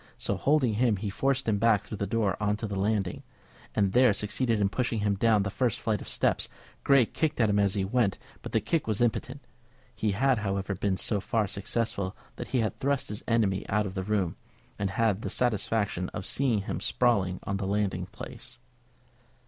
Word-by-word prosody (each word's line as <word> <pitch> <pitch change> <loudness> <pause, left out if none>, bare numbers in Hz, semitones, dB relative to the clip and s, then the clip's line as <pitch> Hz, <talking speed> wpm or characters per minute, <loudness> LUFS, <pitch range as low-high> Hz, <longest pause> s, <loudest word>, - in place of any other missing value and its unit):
So 100 - -1
holding 135 +2 +2
him 115 0 +2
he 100 +1 -3
forced 135 +4 0
him 105 -2 +2
back 110 -3 +3
through 105 - -7
the 100 - -1
door 105 -2 +1
on 105 0 +1
to 110 - -4
the 100 -2 -4
landing, 100 -2 0 0.5
and 100 -2 +2
there 125 -3 +6
succeeded 110 +3 0
in 100 - +3
pushing 115 +1 -1
him 105 -1 +2
down 105 0 +3
the 100 - -3
first 125 -1 0
flight 110 -2 -1
of - - -9
steps. - - 0 0.3
Grey 140 -3 +5
kicked 155 +5 -2
at 110 -3 +4
him 100 - +2
as 100 -1 +2
he 95 -2 0
went, 105 -1 +1 0.2
but - - -7
the - - +2
kick 165 -7 -1
was 110 -2 0
impotent. 125 +3 -1 0.5
He 105 -2 -1
had, 130 +3 +2
however, 100 -1 -2
been 95 0 -1
so 100 +2 0
far 110 +2 0
successful 100 -1 -2 0.2
that - - -5
he 125 - +1
had 110 -3 -2
thrust 140 -1 0
his 105 +1 -4
enemy 110 -5 +2
out 105 +1 +1
of 95 - -5
the 95 - -2
room, 95 -3 -1 0.4
and 100 -1 0
had 105 0 +1
the - - -3
satisfaction 105 -5 0
of 105 - -4
seeing 125 -7 +1
him - - -3
sprawling 100 -7 +1
on 100 - -2
the 95 -1 -3
landing 95 -3 -1
place. - - -9
105 Hz, 205 wpm, -28 LUFS, 100-115 Hz, 0.5 s, there